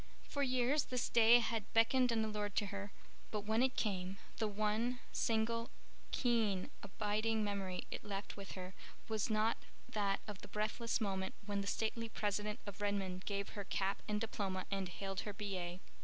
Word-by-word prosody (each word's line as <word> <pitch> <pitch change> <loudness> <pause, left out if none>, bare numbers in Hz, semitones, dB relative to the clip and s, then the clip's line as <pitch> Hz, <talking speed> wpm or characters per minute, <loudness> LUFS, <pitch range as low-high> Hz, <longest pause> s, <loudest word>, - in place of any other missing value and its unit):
For 285 - -3
years 255 +2 +3
this 250 -2 -1
day 235 0 +8
had 225 -3 -1
beckoned 245 +2 +5
and 225 -1 +2
allured 210 -2 -2
to 210 - +3
her; 200 0 -4 0.4
but 210 - -1
when 220 +3 +2
it 260 0 +3
came 190 -2 0 0.2
the 220 - +2
one 215 +4 +1
single, 230 +1 +1 0.4
keen, 220 -7 +2
abiding 215 +2 0
memory 195 -3 -1
it - - -4
left 200 -1 -4
with 200 -2 -7
her 185 0 -6 0.3
was 220 -1 0
not 215 +1 +3 0.3
that 200 -2 +1
of 205 -2 -6
the - - -8
breathless 215 +3 0
moment 190 -2 -1
when 200 -1 0
the 200 - -4
stately 225 +3 0
president 210 0 -1
of 205 0 -7
Redmond 195 -3 -1
gave 200 -1 -1
her 205 - -5
cap 195 0 0
and 210 -1 +1
diploma 195 -4 -2
and 195 -2 0
hailed 195 +1 -3
her 210 - -3
B.A. 185 -4 -3
210 Hz, 170 wpm, -38 LUFS, 195-225 Hz, 0.4 s, day